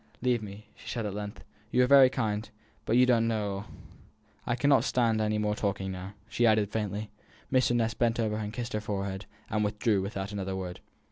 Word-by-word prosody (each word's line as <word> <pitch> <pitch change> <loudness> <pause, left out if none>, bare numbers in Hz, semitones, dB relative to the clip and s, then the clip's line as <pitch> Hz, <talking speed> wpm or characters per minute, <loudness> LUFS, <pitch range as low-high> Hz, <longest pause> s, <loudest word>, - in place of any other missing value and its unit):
"Leave 125 -2 +2
me," 105 0 -9
she - - -11
said, 115 -2 -2
at 100 - -3
length. 105 0 -6 0.3
"You 125 +2 +3
are - - +5
very 135 0 +8
kind, 110 -4 -2 0.4
but 115 - +2
you 125 - +7
don't 115 -2 +3
know 110 -2 0
all. 100 +1 -5 0.8
I 120 - +1
cannot 135 +3 +4
stand 115 -3 +2
any 105 0 +1
more 105 0 +1
talking 100 -2 -2
now," 95 +2 -7
she 120 +1 +2
added, 105 -2 +3
faintly. 105 -1 -3 0.4
Mr. 130 -2 +3
Ness 115 -1 +1
bent 120 -1 +1
over 110 -2 0
her - - -3
and 105 - -4
kissed 120 +1 -5
her 105 - -1
forehead, 100 -2 -4 0.2
and 105 0 +1
withdrew 105 -1 +1
without 100 0 -4
another 95 -2 -3
word. 90 -2 -5
105 Hz, 210 wpm, -29 LUFS, 100-120 Hz, 0.8 s, very